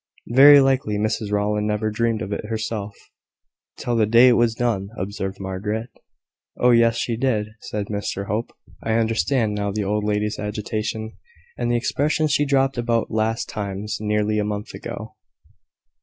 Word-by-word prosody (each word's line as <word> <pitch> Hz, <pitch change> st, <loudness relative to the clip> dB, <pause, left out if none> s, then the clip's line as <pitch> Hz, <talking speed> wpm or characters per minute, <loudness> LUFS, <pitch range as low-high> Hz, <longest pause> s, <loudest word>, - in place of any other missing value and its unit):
"Very 140 Hz, +2 st, +9 dB
likely 135 Hz, -6 st, +1 dB
Mrs 110 Hz, 0 st, -1 dB
Rowland 105 Hz, +1 st, 0 dB
never 105 Hz, 0 st, -1 dB
dreamed 115 Hz, 0 st, 0 dB
of 100 Hz, -, -4 dB
it 105 Hz, -, -4 dB
herself; 110 Hz, -2 st, -4 dB, 0.8 s
till 120 Hz, -, -2 dB
the 110 Hz, -2 st, +3 dB
day 120 Hz, +3 st, +7 dB
it 120 Hz, -, +5 dB
was 120 Hz, -1 st, +2 dB
done," 110 Hz, -5 st, -1 dB
observed 95 Hz, 0 st, -4 dB
Margaret. 105 Hz, +5 st, -4 dB, 0.7 s
"Oh, 125 Hz, -, +4 dB
yes, 115 Hz, -1 st, +4 dB
she 115 Hz, 0 st, -1 dB
did," 110 Hz, -4 st, 0 dB
said 105 Hz, -1 st, -4 dB
Mr 100 Hz, -1 st, -3 dB
Hope. 110 Hz, +4 st, -2 dB, 0.3 s
"I 110 Hz, -, -1 dB
understand 115 Hz, 0 st, +1 dB
now 100 Hz, 0 st, -2 dB
the 105 Hz, +1 st, -2 dB
old 105 Hz, +1 st, -1 dB
lady's 105 Hz, 0 st, -1 dB
agitation, 110 Hz, +1 st, -4 dB, 0.4 s
and 120 Hz, -1 st, -2 dB
the 120 Hz, -, +2 dB
expressions 150 Hz, +5 st, 0 dB
she 145 Hz, 0 st, +2 dB
dropped 135 Hz, -2 st, +2 dB
about 115 Hz, -1 st, 0 dB
`last 110 Hz, +1 st, -1 dB
times' 105 Hz, 0 st, -4 dB
nearly 105 Hz, 0 st, 0 dB
a -, -, +1 dB
month 105 Hz, 0 st, -4 dB
ago." -, -, -8 dB
110 Hz, 160 wpm, -22 LUFS, 105-120 Hz, 0.8 s, Very